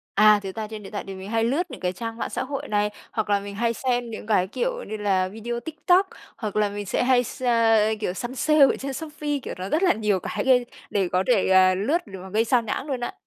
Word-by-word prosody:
À, 210 0 +6
thật 190 -1 -6
ra 215 -1 -3
trên 215 -1 -8
điện 195 - -11
thoại 205 - -4
thì 195 - -6
mình 190 +2 -8
hay 225 0 +1
lướt 305 +8 0
những 255 - -9
cái 180 0 -1
trang 225 +4 -6
mạng - - -4
xã - - -2
hội 275 0 -5
này, 210 0 +1 0.2
hoặc 215 -2 -2
là 200 0 +3
mình 200 0 -8
hay 230 +2 0
xem 245 -2 -1
những 215 - -7
cái, 190 -4 +2
kiểu - - -2
như 215 - -5
là, 190 -3 +1
video 235 +4 -5
TikTok, 355 +5 +2 0.3
hoặc 215 -3 -5
là 210 -1 +3
mình 205 0 -6
sẽ 220 - 0
hay 250 -1 +4
s 255 - -8 0.6
kiểu, 180 - -1
săn 240 +6 -5
sale 305 +2 +2
ở - - 0
trên 275 0 -5
Shopee, 295 0 -3
kiểu, - - -5
nó 185 +1 -4
rất 320 - +1
là 365 - +5
nhiều 210 -4 0
cái - - -3
gây 250 -2 +4 0.2
để 195 -3 +1
có 185 +1 +2
thể, 225 -7 +3
ờ, 185 0 +6
lướt 280 - 0
để 195 -2 -9
mà 190 - -9
gây 220 +3 +2
xao 240 0 +2
nhãng 245 +5 -3
luôn 265 -4 -3
á. 240 - -3
220 Hz, 270 wpm, -24 LUFS, 200-260 Hz, 0.6 s, À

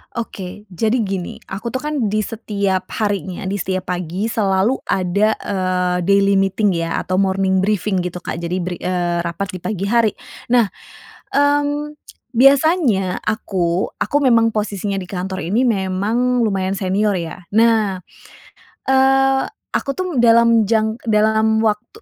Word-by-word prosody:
Oke. 210 -3 -6
Jadi 220 +6 0
gini, 190 -3 -4 0.2
aku 210 +5 -5
tuh 260 +4 -3
kan 295 -7 -1
di 215 +1 0
setiap 200 -4 -2 0.2
harinya, 195 -3 -2
di 195 +1 -2
setiap 185 0 -3
pagi 180 +5 -3
selalu 200 +4 +1
ada, 200 +4 +1
eee, 185 -2 -1
daily 200 0 +4
meeting 195 +1 +1
ya 165 -1 -2
atau 185 +1 -1
morning 190 -1 +1
briefing 195 -1 0
gitu 180 0 -5
Kak. 170 - -4
Jadi 170 +1 -3
bri 180 -1 -4
eee, 175 -1 -1
rapat 170 +3 -3
di 185 - -7
pagi 195 0 -4
hari. 220 0 +2 0.3
Nah, 240 -1 +4 0.7
mmm, 290 +1 +1 0.4
biasanya 270 - +3
aku 185 -4 -1
aku 290 - -2
memang 230 -5 +4
posisinya 205 -2 -2
di 185 - -6
kantor 185 0 -4
ini, 220 +8 +1
memang 225 +3 +1
lumayan 195 -3 0
senior 200 +2 0
ya. 170 -1 -4 0.2
Nah, 220 -5 +3 0.9
eee, 270 0 +4 0.3
aku - - -2
tuh 370 +3 -3
dalam 230 -1 +5
jang 220 +1 +1
dalam 220 0 +2
waktu 220 - -2
205 Hz, 140 wpm, -19 LUFS, 185-230 Hz, 0.9 s, dalam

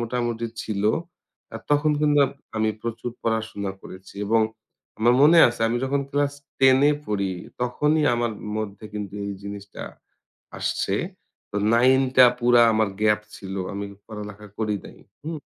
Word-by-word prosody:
মোটামুটি 120 -1 -2 0.2
ছিল। 100 -2 -3 0.7
আর - - -6
তখন 145 +1 +3
কিন্তু 150 -1 +4 0.4
আমি 110 0 +2
প্রচুর 115 +1 -4
পড়াশোনা 110 -3 -2
করেছি, 95 +1 -12
এবং 115 +1 +3 0.6
আমার 120 +2 +4
মনে 165 +3 +7
আছে 120 -1 -7
আমি 120 - 0
যখন 140 +1 0
ক্লাস 145 0 +1 0.3
10 130 0 +6
এ - - +3
পড়ি 100 -2 -1 0.3
তখনই 150 +5 +1
আমার 120 -1 -1 0.3
মধ্যে 105 0 -6
কিন্তু 105 -1 -5
এই 100 - -3
জিনিসটা 100 0 -8 0.8
আসছে। - - -1 0.6
তো 105 - -2 0.2
9 130 +3 +5
টা 125 - +10
পুরা 120 0 +5
আমার 110 -2 +2
গ্যাপ 105 0 +3 0.2
ছিল। 95 0 -7 0.2
আমি 100 0 -4 0.2
পড়ালেখা 105 -1 -8
করি 105 -1 0
নাই। - - -12 0.3
হু? 160 - -4
115 Hz, 145 wpm, -24 LUFS, 105-130 Hz, 0.8 s, টা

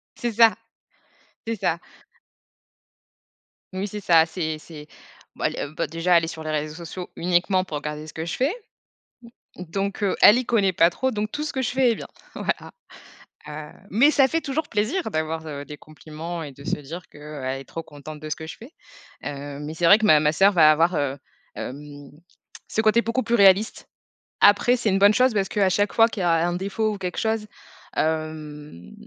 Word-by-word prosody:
C'est 240 - -3
ça. 225 0 +6 0.9
C'est 230 - -2
ça. 170 -4 -1 2.0
Oui 190 +2 -3
c'est 210 +1 -7
ça, 165 -4 +5
c'est 160 -2 -3
c'est 150 -2 -12 0.5
bah, - - +1
le 145 - -5
bah, - - -2
déjà 165 +3 +2
elle 165 - +1
est - - -6
sur 160 -1 -7
les 155 - -3
réseaux 155 0 -3
sociaux 175 +2 -8
uniquement 180 +2 +1
pour 155 -5 -5
regarder 150 +1 -6
ce 155 - -11
que 160 - -5
je 170 - -3
fais. 275 +7 +1 1.1
Donc 195 +4 -4
heu, 200 - +1
elle 215 - +9
y 255 - -3
connaît 200 -5 +2
pas 165 0 +5
trop, 260 +9 -1
donc 215 -1 -3
tout 295 - -4
ce - - -4
que 265 - -2
je 245 - -1
fais 260 -1 +2
est 230 - +1
bien, - - -8 0.3
voilà, - - -3 0.8
heu, 150 0 -8 0.2
mais 255 +9 +5
ça 275 -3 +4
fait 325 +5 -1
toujours 295 +1 -3
plaisir 230 - -1
d'avoir, 160 0 -2
heu, 145 -2 -6
des 150 0 -9
compliments 155 +3 -8
et 150 - -7
de 140 +1 -14
se - - -1
dire 160 +6 -8
que, - - -16
heu, 150 -1 -8
elle 135 +1 -3
est - - -11
trop 165 +4 -7
contente 150 +1 -10
de 155 +1 -8
ce 150 - -1
que 160 0 -9
je 180 - -8
fais, 250 +9 -13 0.5
heu, 145 0 -6
mais 150 +2 -6
c'est 170 - -3
vrai 200 +5 +8
que 220 - -2
ma 155 -4 +7
ma 150 0 +2
sœur 195 +4 +5
va 155 -4 +6
avoir, 165 +3 +2
heu, 140 -1 -1 0.4
hem, 145 +1 -8 0.6
ce - - -1
côté 220 +1 +4
beaucoup 230 +3 -1
plus 235 - +1
réaliste. 200 +2 +4 0.5
Après 205 +5 +5
c'est 235 -3 -1
une 195 -1 +2
bonne 200 +1 +6
chose 250 0 +3
parce 195 -2 0
qu'à 200 -3 +2
chaque 205 +2 +1
fois 225 0 +5
qu'il 205 -4 -5
y - - 0
a 170 - +3 0.2
un 175 - -2
défaut 210 +3 -1
ou - - -8
quelque 180 -2 -5
chose, 220 -1 0 0.5
hem, 155 - -4
175 Hz, 210 wpm, -23 LUFS, 155-215 Hz, 2.0 s, elle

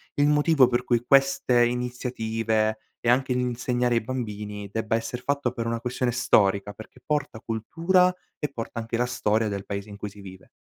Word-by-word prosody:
il 145 0 +3
motivo, 150 -1 +5
per 120 0 0
cui 120 -1 +1
queste 135 -3 +4
iniziative, 115 -3 -1 0.2
e - - -5
anche 130 +1 +3
l'insegnare 125 0 0
ai 115 - +2
bambini, 105 -4 -5
debba 110 0 -1
esser 115 +2 -3
fatto 140 -3 0
per 115 0 -4
una 115 0 -1
questione 125 +1 -1
storica, 105 -5 +2
perché 110 - -13
porta 150 -6 -1
cultura 170 - +2 0.3
e 150 - -2
porta 115 -2 -5
anche 115 +1 -3
la 125 - +2
storia 110 -2 0
del 100 -1 -4
paese 100 +1 -5
in 100 - -9
cui 105 0 -5
si 100 +1 -14
vive. 95 -1 -12
120 Hz, 180 wpm, -25 LUFS, 110-125 Hz, 0.3 s, motivo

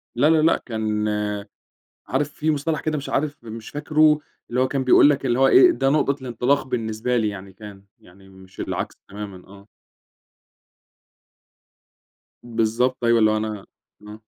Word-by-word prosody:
لا، 140 +6 +3
لا، 160 -1 +4
لأ، 165 +2 +3
كان 110 -2 -2 1.0
عارف 140 +2 -1
في 155 +1 0
مصطلح 150 +1 -1
كده 155 -1 -2
مش 140 - -6
عارف 145 -3 -2
مش 110 0 -8
فاكره 150 +1 +2 0.3
اللي 125 +1 -1
هو 130 - +2
كان 135 0 -2
بيقول 130 +3 +6
لك، 140 -1 0
اللي 125 0 +1
هو 135 - +5
إيه، 360 - +7
ده 135 - 0
نقطة 140 -2 +1
الانطلاق 130 +3 0
بالنسبة 115 0 -2
لي 110 -2 +1
يعني، 95 -1 -9
كان، 100 -2 -12 0.2
يعني 95 +2 -19
مش 95 0 -17
العكس - - -4
تمامًا، 100 -2 -9
آه. 100 +1 -16 2.8
بالضبط، 120 +2 0
أيوه 115 0 +4
اللي 110 -1 +4
هو 110 - +1
أنا 105 -2 -4 0.4
آه. 105 +1 -10
120 Hz, 160 wpm, -22 LUFS, 105-140 Hz, 2.8 s, إيه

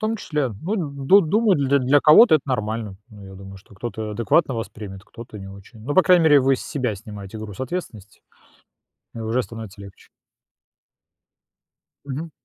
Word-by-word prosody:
том 220 +1 -1
числе, 150 - -2
ну, 195 +7 -3 0.3
ду 195 +8 +6
думаю, 200 +3 +2
для 140 0 +2
для 135 +2 +3
кого-то 160 - +7
это 155 - +2
нормально. 110 -4 -3
Ну, 105 -2 -13
я 95 - -11
думаю, 95 0 -11
что 100 +1 -18
кто-то 110 0 -5
адекватно 120 - +1
воспримет, 105 -3 -7
кто-то 115 -1 -11
не 95 - -9
очень. 100 +4 -14
Но, 145 +4 -3
по 185 - +6
крайней 180 -3 +4
мере, 145 -3 +6
вы 135 0 +2
с - - -8
себя 130 -7 -2
снимаете 105 0 -10
груз 105 +1 -9
ответственности, 120 - -7 0.9
и - - -8
уже 115 +3 -1
становится 110 -4 -10
легче. 100 -1 -14 2.0
Мгм. 145 +4 -6
115 Hz, 170 wpm, -22 LUFS, 105-150 Hz, 2.0 s, кого-то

